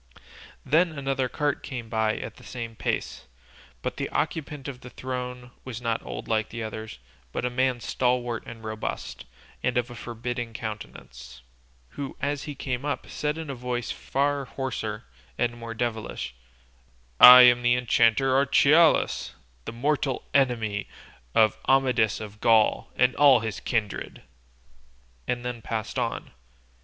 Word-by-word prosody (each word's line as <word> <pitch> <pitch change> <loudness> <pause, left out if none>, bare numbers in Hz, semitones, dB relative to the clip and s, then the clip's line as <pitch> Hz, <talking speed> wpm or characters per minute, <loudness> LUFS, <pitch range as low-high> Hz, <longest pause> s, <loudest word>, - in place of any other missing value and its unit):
Then 165 0 +2
another 135 -2 -1
cart 145 +1 -1
came 120 -4 -6
by 110 -1 0
at - - -7
the - - -15
same 115 -2 -7
pace, - - -3 0.6
but - - -3
the - - -3
occupant 150 -3 -3
of 130 -2 -7
the 125 - -10
throne 125 -1 -6
was 125 -3 -6
not 115 -2 -1
old - - -7
like 110 -1 0
the 115 0 -5
others, 110 - -6 0.3
but - - -3
a 125 - -1
man 130 0 +1
stalwart 125 -1 0
and 115 -1 -10
robust, 110 0 -5 0.4
and 125 -1 0
of 120 0 -1
a - - -8
forbidding 120 0 -5
countenance, 65 - -8 0.5
who 140 - -7
as 145 0 -2
he 150 -2 -6
came 130 -1 -3
up 145 - -2
said 150 +1 -2
in 160 -3 -5
a - - -4
voice 125 -1 -3
far 140 0 -1
hoarser 115 -5 -4 0.3
and 120 -1 0
more 115 0 -6
devilish, 110 - -3 0.9
"I 125 0 +12
am 120 0 +6
the 120 0 +3
enchanter 125 +2 +3
Archelaus, 145 +4 +4 0.3
the - - -5
mortal 135 +2 -1
enemy 115 -7 +1 0.5
of 110 -1 +4
Amadis 125 -5 +3
of 105 0 -9
Gaul 110 -2 +3
and 125 0 +3
all 140 -5 +6
his 110 -4 -4
kindred," 110 -4 -3 1.0
and 120 0 -2
then 120 -2 -4
passed 110 -1 -3
on. - - -3
125 Hz, 150 wpm, -26 LUFS, 115-135 Hz, 1.0 s, I